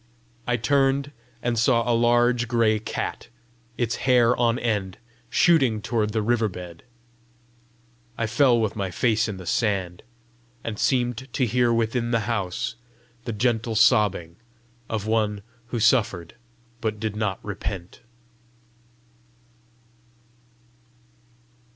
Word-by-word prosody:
I 125 -1 +1
turned, 135 +4 +1 0.3
and 120 -2 0
saw 115 0 +2
a 120 - +3
large 120 +1 +3
gray 115 -2 +2
cat, 110 - -5 0.5
its 120 -1 -1
hair 125 -2 +3
on 120 -1 +1
end, 105 -6 -2 0.3
shooting 130 -3 +3
toward 110 0 -1
the 110 0 -1
river 115 -1 +1
bed. 90 -2 -9 1.4
I 115 - 0
fell 120 +1 +3
with 110 -1 -1
my 100 -3 -2
face 115 +3 +1
in 105 -3 -5
the 95 - -9
sand, 95 -3 -1 0.6
and 110 -2 -5
seemed 125 0 0
to 130 - +1
hear 120 +1 +2
within 115 +1 0
the 115 -1 +1
house 105 -5 -2 0.5
the 115 - -3
gentle 115 0 0
sobbing 105 -7 +3 0.5
of 110 -2 -3
one 105 -2 0 0.2
who 120 - -3
suffered 100 -8 +2 0.5
but 110 -2 -2
did 110 -1 -3
not 105 -3 -1
repent. 95 -3 -6
115 Hz, 120 wpm, -24 LUFS, 105-120 Hz, 1.4 s, a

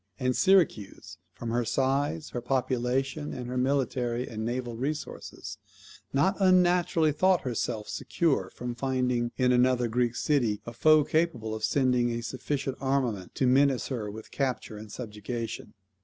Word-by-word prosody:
And 125 -1 +1
Syracuse, 180 - +1
from 115 - -6
her 120 +1 +1
size, 140 +6 0
her 120 - -4
population, 130 +3 -1
and 125 - -5
her 125 +1 -5
military 125 -2 0
and 110 -1 -5
naval 120 0 -3
resources, 145 +6 -5 0.5
not 145 +8 +2
unnaturally 180 -3 +4
thought 185 +4 +3
herself 115 -3 -3
secure 165 -5 0
from 125 0 -5
finding 125 -2 0
in 125 -1 +3
another 125 0 +3
Greek 120 +1 0
city 120 -9 +1
a 115 - -7
foe 155 +5 +5
capable 140 -10 0
of 110 0 -5
sending 125 -2 +2
a 115 0 -3
sufficient 135 +2 -3
armament 130 -9 -1
to 130 - +1
menace 135 0 +3
her 115 -6 -3
with 110 +2 -10
capture 130 -5 -2
and 105 0 -9
subjection. 115 0 -6
125 Hz, 145 wpm, -28 LUFS, 120-140 Hz, 0.5 s, foe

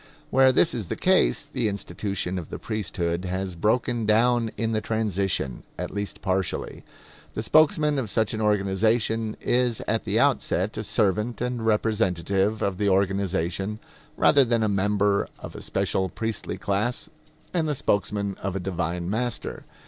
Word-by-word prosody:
Where 130 0 +6
this 165 +6 +3
is 110 -6 -4
the - - -3
case 185 -5 +2
the 130 -6 -1
institution 95 -1 -3
of 80 - -9
the - - -5
priesthood 90 -4 -3
has 95 0 -3
broken 115 +4 +1
down 115 +1 +3
in 115 0 0
the 110 -1 0
transition, 100 - -1 0.2
at - - -4
least 100 0 -5
partially. 95 -1 -2 0.5
The 110 - -2
spokesman 150 +1 +4
of 115 -6 -3
such 110 +3 +1
an 110 - -2
organization 110 +2 +1
is 120 -2 +1
at - - -1
the - - +1
outset 95 +5 +1
a 110 - -3
servant 105 +1 0
and 125 -1 -2
representative 105 -2 +1
of 95 -2 -1
the 100 -1 +2
organization, 95 0 0 0.4
rather 140 -2 +6
than 115 -2 +1
a - - +2
member 100 0 +1
of - - -9
a - - -7
special 95 -1 -1
priestly 115 -2 -4
class 110 +9 -1 0.5
and 165 -3 +1
the 150 - 0
spokesman 100 -3 0
of 95 -1 -3
a - - -1
divine 85 -1 -2
master. 120 +4 -3
105 Hz, 155 wpm, -25 LUFS, 95-115 Hz, 0.5 s, Where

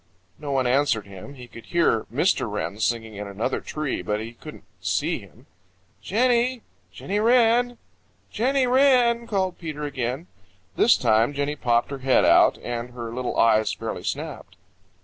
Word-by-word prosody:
No 145 -2 -5
one 135 -2 +1
answered 125 -4 +1
him. 100 +8 -11
He 125 -2 -11
could 115 -1 -13
hear 170 -10 +1
Mr. - - +1
Wren 105 - -4
singing 110 -2 -2
in 105 0 -6
another 105 +6 -3
tree, 150 -9 -4
but 105 +4 -2
he 115 +2 -7
couldn't - - -12 0.2
see - - -1
him. - - -18 0.6
"Jenny! 245 +2 +1 0.3
Jenny 205 +2 -3
Wren! 240 +1 +3 0.5
Jenny 260 +4 +1
Wren!" 245 -3 +3
called 190 -3 -1
Peter 155 -3 -6
again. 135 +1 -3 0.5
This - - +5
time 115 +6 +2
Jenny 145 +1 -1
popped 120 -2 0
her 140 - -5
head 130 0 +3
out, - - +5
and 120 0 -5
her 115 -2 -6
little 125 0 -3
eyes 110 -1 +3
fairly - - -5
snapped. - - -6
140 Hz, 155 wpm, -24 LUFS, -, 0.6 s, This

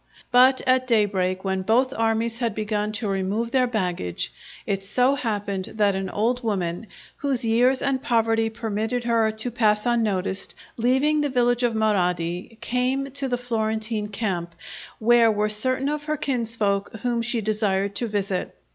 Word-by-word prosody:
But 255 +1 +6
at 255 0 +3
daybreak, 195 -5 +1
when 190 0 0
both 245 +7 +2
armies 225 -1 0
had 230 -4 -1
begun 210 -1 -1
to 220 0 -2
remove 200 +4 -1
their 255 -1 +3
baggage, 180 - -2 0.3
it 195 -1 -2
so 250 +7 +2
happened 205 -7 -2
that 205 -2 +3
an 190 0 -3
old 235 +6 0
woman, 190 -2 -2 0.3
whose 270 -4 -1
years 245 +4 +3
and 275 -2 +1
poverty 225 -2 +1
permitted 225 +2 -2
her 230 -2 +2
to 220 +3 -4
pass 210 -2 +2
unnoticed, 200 -5 -1 0.2
leaving 265 +6 +2
the 290 - 0
village 245 -1 +2
of 240 -2 +1
Marradi, 180 -2 0
came 260 +3 -1
to 275 0 -3
the 245 -1 -1
Florentine 220 -2 -2
camp, 190 -5 -3 0.4
where 230 0 +5
were 210 0 0
certain 255 +6 0
of 295 0 -2
her 305 0 -1
kinsfolk 230 -8 -1
whom 240 -1 0
she 235 0 0
desired 200 -2 0
to 240 - -1
visit. 200 -3 -2
225 Hz, 155 wpm, -24 LUFS, 205-245 Hz, 0.4 s, But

